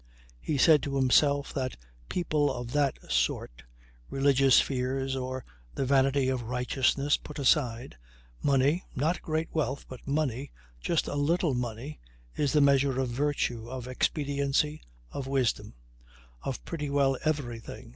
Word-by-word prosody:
He 145 - -2
said 150 +1 +6
to 140 -1 -3
himself 140 +2 +3
that 130 -2 -2
for - - -14 0.3
people 150 -5 +1
of 120 -2 -5
that 145 -1 +1
sort - - 0 0.5
(religious 135 -1 +4
fears 135 0 -1
or 130 0 -4 0.3
the 135 - -1
vanity 135 0 +3
of 130 -2 0
righteousness 125 +4 +1
put 150 - -10
aside) 125 - +1 0.4
money 140 +5 +2
not 155 +6 0
great 160 0 -2
wealth, 145 -3 -1
but 130 0 -11
money, 140 -2 -1 0.3
just - - 0
a - - -3
little 155 +2 +1
money 125 +4 -4 0.4
is 145 -3 +1
the 150 - +4
measure 140 -2 +3
of 130 -2 0
virtue, 120 -3 -1
of 130 -1 -6
expediency, 140 +2 0 0.3
of 135 - -5
wisdom 125 - -1 0.7
of 135 - -5
pretty 150 -4 -4
well 140 -1 +2
everything. 120 -6 -3
135 Hz, 140 wpm, -29 LUFS, 125-145 Hz, 0.7 s, said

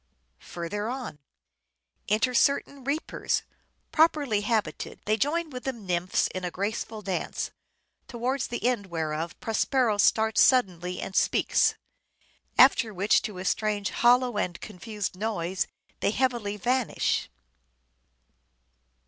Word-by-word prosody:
Further 205 +6 -4
on: 250 - -5 0.4
— - - -53
"Enter 225 +5 +2
certain 280 +1 +1
reapers, 285 +4 -1 0.5
properly 295 -9 +3
habited; 215 0 -2
they 215 - +2
join 310 +7 0
with 250 -1 -7
the 265 - -1
Nymphs 185 -6 -1
in 185 - -4
a 180 - -1
graceful 210 +3 -4
dance; 190 -2 -3 0.6
towards 250 +2 -2
the 240 - -4
end 235 -6 0
whereof 160 -1 -3
Prospero 225 -1 +1
starts 220 +1 +4
suddenly 180 -8 +3
and 190 - -6
speaks; - - +3 0.8
after 240 -3 +6
which 200 +2 +3
to 205 -4 -6
a 185 - -6
strange 205 0 0
hollow 245 -2 +3
and 175 -3 -2
confused 210 -1 -5
noise 185 -4 -2 0.3
they - - +1
heavily 230 -3 0
vanish." 245 - 0
215 Hz, 120 wpm, -27 LUFS, 185-250 Hz, 0.8 s, after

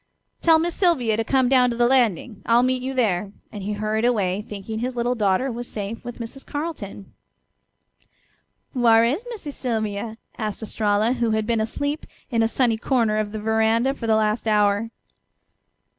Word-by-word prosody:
"Tell 325 -1 +6
Miss 340 +2 -1
Sylvia 285 - +2
to 225 - 0
come 260 +2 +2
down 250 -1 +4
to 235 - -2
the 240 0 +3
landing; 235 -4 +1
I'll 235 +1 +5
meet 255 0 +1
you 265 +1 -4
there," 200 -5 +1 0.2
and 205 - -7
he 205 +2 -3
hurried 215 +1 -1
away, 205 -5 +1
thinking 210 +1 -6
his 250 +2 -3
little 240 +1 0
daughter 215 +3 +1
was 240 +1 -5
safe 210 +2 -5
with 240 -1 -7
Mrs. 235 +3 -7
Carleton. 290 - -6 1.6
"Whar' 230 -3 +5
is 285 - 0
Missy 410 -11 -6
Sylvia?" 220 -4 -3 0.2
asked 215 0 -3
Estralla, 215 +1 +1
who 240 -2 0
had 215 - -1
been 230 -1 +1
asleep 285 +7 -3 0.2
in 230 -2 +2
a 225 - +3
sunny 230 -1 +1
corner 225 -3 +1
of 210 -1 -2
the 215 - -5
veranda 220 +4 +2
for 235 -4 -6
the 220 - +4
last 215 +1 0
hour. 210 +1 +2
230 Hz, 175 wpm, -23 LUFS, 215-250 Hz, 1.6 s, Tell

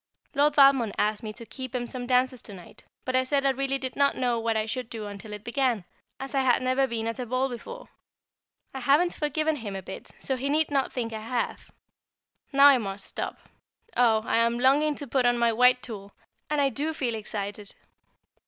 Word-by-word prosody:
Lord 290 +1 +3
Valmond 275 -6 +5
asked 210 +1 +1
me 215 -2 -5
to 230 +1 -10
keep 260 +1 -7
him 245 -1 -1
some 245 0 -5
dances 255 0 +2
to 205 - -9
night, 180 - -14 0.2
but 255 - -1
I 255 - +5
said 275 +1 0
I 275 - +5
really 275 +1 -1
did 260 -1 -5
not 280 0 +2
know 245 -2 +1
what 225 -1 0
I 215 - 0
should 230 +2 -4
do 220 -2 -6
until 205 +1 -8
it 210 0 -7
began, 240 -5 0 0.3
as 270 +1 -7
I 275 - +2
had 255 -1 +3
never 260 +1 +2
been 230 -2 -3
at 230 +3 -3
a 250 - -3
ball 255 +3 0
before. 470 - -8 0.9
I 265 - -5
haven't 290 +8 +3
forgiven 310 +1 -1
him 210 -6 -6
a 190 - -6
bit, 190 - -9
so 265 - -2
he 270 +2 -2
need 305 +1 +2
not 275 -2 +1
think 230 -3 -3
I 220 - -5
have. 235 +2 -3 0.8
Now 275 0 +6
I 280 -3 +8
must 195 -2 -5
stop. - - -5 0.5
Oh! 225 -3 +4
I - - +1
am 230 +1 +2
longing 285 +4 +3
to 285 - -6
put 255 -1 +1
on 245 0 +3
my 235 -1 +2
white 250 +2 +4
tulle, 200 -3 -8 0.4
and 300 -1 0
I 280 -1 +3
do 295 +6 -3
feel 245 -5 -1
excited. 205 -1 -5
250 Hz, 220 wpm, -27 LUFS, 225-275 Hz, 0.9 s, I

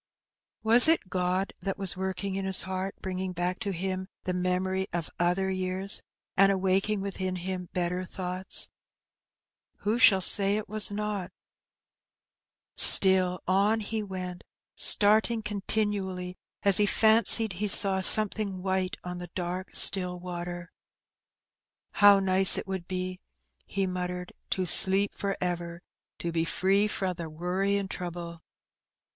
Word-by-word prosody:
Was 235 +5 +7
it 320 - 0
God 185 +1 -3
that 195 -1 -6
was 195 -3 0
working 190 +1 -5
in 195 - -5
his 190 -1 +2
heart, 190 +1 -6
bringing 185 0 -6
back 180 +1 -4
to 200 - -5
him 185 +1 -6 0.2
the 185 - -4
memories 185 +1 -3
of 170 -2 -6
other 180 +2 -1
years, 185 +1 -2 0.3
and 195 +1 +3
awaking 195 +2 -2
within 190 -1 -5
him 180 0 -7
better 180 0 -4
thoughts? 185 0 -5 1.1
Who 215 +4 -2
shall 200 -6 +5
say 200 +2 +3
it 215 - -7
was 215 0 -1
not? 205 -2 -6 1.4
Still 185 -2 +6
on 200 +4 0
he 220 +1 -5
went, 185 -3 -8 0.3
starting 220 +2 +2
continually 200 -3 -4 0.3
as 200 -2 +5
he 210 - +1
fancied 220 0 +4
he 205 +4 -4
saw 195 -1 +8
something 200 -2 +3
white 190 +1 -3
on 180 0 -8
the 175 -1 -10
dark 180 +1 -7
still 180 -2 +5
water. 175 0 -9 1.3
''How 205 -1 +5
nice 190 0 +3
it - - -6
would 190 -3 -7
be," 185 0 -6 0.5
he 195 -1 -3
muttered, 180 -1 -7
" - - -50
to 185 - -3
sleep 195 +3 +4
for 200 -1 -5
ever! 175 -1 -6 0.3
to 170 - -6
be 165 -1 -2
free 195 +5 -1
fra 190 -3 -4
the 170 -2 -9
worry 180 +5 -4
an^ 200 -1 -3
trouble." 170 -2 -8
190 Hz, 140 wpm, -26 LUFS, 180-200 Hz, 1.4 s, saw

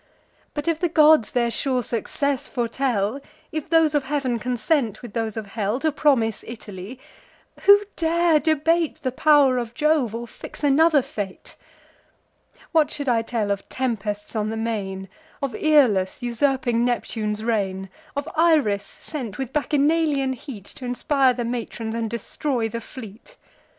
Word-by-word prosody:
But, 295 +2 -4
if 330 -2 +1
the 350 - +1
gods 310 -6 +5
their 235 -1 +1
sure 255 +1 0
success 270 +4 -1
foretell; 240 -2 -1 0.3
If 310 0 -4
those 325 -2 +4
of 290 -2 +1
heav'n 265 -4 -1
consent 250 0 -1
with 235 -4 -9
those 225 -2 -2
of 220 - -4
hell, 215 +2 -1
To 315 +2 +1
promise 260 -8 +1
Italy; 215 0 -8 0.7
who 405 0 +8
dare 335 -1 +3
debate 320 +1 +1
The 255 - 0
pow'r 275 -2 +4
of 235 0 -6
Jove, 300 -6 +2
or 235 +1 -5
fix 235 - -11
another 295 0 +4
fate? 200 -5 -7 1.2
What 315 -3 +3
should 285 -3 -3
I 230 -2 +3
tell 225 -3 -2
of 200 0 -3
tempests 215 -5 -3
on 215 -1 0
the 220 - -3
main, 200 -4 -3 0.3
Of 275 -3 -3
Aeolus 245 -12 +3
usurping 240 -1 +1
Neptune's 220 -3 -2
reign? 195 -4 -1 0.3
Of 285 +1 -3
Iris 305 -12 +3
sent, 250 -10 -7
with 265 -1 -5
Bacchanalian 295 -2 +1
heat 240 -6 -9
T' - - -12
inspire 255 +1 +2
the 240 -1 -2
matrons, 230 -1 -4
and 230 -1 -2
destroy 235 +2 -2
the 230 +1 -5
fleet? 235 - -11
250 Hz, 150 wpm, -23 LUFS, 225-295 Hz, 1.2 s, who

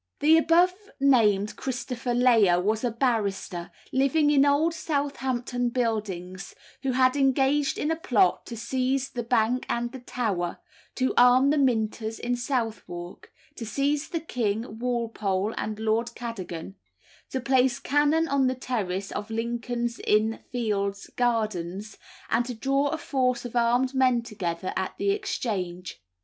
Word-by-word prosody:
The 310 +2 +6
above 335 +3 +4 0.3
named 215 -7 +3
Christopher 250 -1 -3
Layer 225 -8 +5
was 215 +5 0
a 245 - +2
barrister, 205 -7 -1 0.2
living 285 +3 +3
in 285 -1 +5
Old 305 +4 +3
Southampton 265 -6 -2
Buildings, 205 -6 -3 0.3
who 265 -2 -1
had 255 +1 +3
engaged 275 +1 +2
in 300 - -1
a - - +1
plot 235 - +2
to 235 - -6
seize 260 +3 -1
the 245 - -3
Bank 235 +1 +1
and 240 0 -1
the 265 - -8
Tower, 205 -8 -2 0.4
to 260 0 0
arm 250 +3 +6
the 300 - +2
Minters 225 -3 0
in 245 +1 -1
Southwark, 225 -9 -4 0.2
to - - -7
seize 280 +6 -1
the 340 -2 -2
king, 225 -6 -3
Walpole, 225 -4 -1
and 215 0 -3
Lord 225 +2 0
Cadogan, 195 -6 -6 0.5
to 260 - -2
place 255 -1 +2
cannon 295 +3 +2
on 275 -3 +2
the 255 - 0
terrace 200 -7 -3
of 210 +1 -5
Lincoln's 235 +1 -3
Inn 215 +1 +1
Fields 200 -5 -2
gardens, 215 -4 -1 0.3
and 235 +2 +2
to 250 - -4
draw 275 +4 +1
a 320 - -1
force 255 -5 0
of 245 - -7
armed 245 +2 +2
men 255 -3 +3
together 185 -6 -4
at 190 - -3
the 400 - +1
Exchange. 185 - -3
240 Hz, 145 wpm, -26 LUFS, 215-265 Hz, 0.5 s, The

